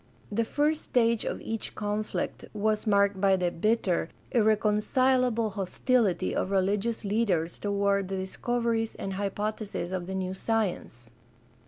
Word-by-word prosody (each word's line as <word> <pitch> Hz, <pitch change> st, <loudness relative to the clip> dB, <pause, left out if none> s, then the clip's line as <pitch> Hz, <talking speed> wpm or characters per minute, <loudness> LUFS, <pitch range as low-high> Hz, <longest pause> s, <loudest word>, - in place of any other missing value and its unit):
The 230 Hz, +3 st, +1 dB
first 295 Hz, +5 st, +1 dB
stage 230 Hz, -2 st, +2 dB
of -, -, -2 dB
each 225 Hz, -1 st, -4 dB
conflict 210 Hz, 0 st, -3 dB
was 215 Hz, +1 st, 0 dB
marked 200 Hz, -2 st, +3 dB
by 195 Hz, -1 st, +5 dB
the 180 Hz, -2 st, 0 dB
bitter, 185 Hz, -3 st, +1 dB, 0.2 s
irreconcilable 225 Hz, +2 st, +2 dB
hostility 200 Hz, +2 st, +1 dB
of -, -, -1 dB
religious 200 Hz, +4 st, 0 dB
leaders 195 Hz, -6 st, 0 dB
toward 200 Hz, -1 st, +1 dB
the 190 Hz, 0 st, -3 dB
discoveries 225 Hz, +4 st, -1 dB
and 195 Hz, -, -4 dB
hypotheses 205 Hz, -1 st, -3 dB
of 180 Hz, -2 st, -3 dB
the 190 Hz, -, -4 dB
new 185 Hz, 0 st, -2 dB
science. 190 Hz, -, -2 dB
210 Hz, 130 wpm, -28 LUFS, 190-225 Hz, 0.2 s, by